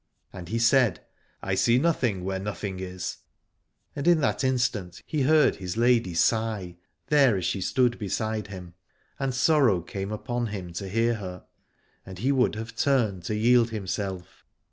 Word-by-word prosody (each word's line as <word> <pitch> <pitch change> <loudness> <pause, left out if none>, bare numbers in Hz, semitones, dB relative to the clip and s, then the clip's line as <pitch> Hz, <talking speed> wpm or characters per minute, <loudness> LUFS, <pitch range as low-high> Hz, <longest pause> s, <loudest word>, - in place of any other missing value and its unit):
And 90 -3 -9
he 115 - -1
said, 120 -1 +3 0.4
I 95 - -1
see 115 +6 +3
nothing 125 - +1
where 95 0 -2
nothing 100 -1 -5
is: 95 -1 -5 0.8
and 140 +3 -3
in 175 -2 +5
that 140 - 0
instant 120 -9 -1
he 155 -3 -2
heard 150 +2 +4
his 90 +1 -5
lady 115 -7 +2
sigh, 105 -2 0 0.3
there 140 -8 +4
as 90 - -3
she 95 - -1
stood 125 +3 +1
beside 110 0 -2
him; 90 -4 -9 0.5
and 135 -1 0
sorrow 130 - +3
came 95 +4 -6
upon 120 +3 -3
him 95 -5 -6
to 95 +3 -5
hear 115 +4 +1
her, 90 -3 -8 0.6
and 95 -1 -10
he 130 +9 +1
would 130 -5 +2
have 110 +1 -7
turned 115 -10 +1
to 105 - -2
yield 120 +2 +4
himself. 95 -4 -5
110 Hz, 165 wpm, -26 LUFS, 95-125 Hz, 0.8 s, in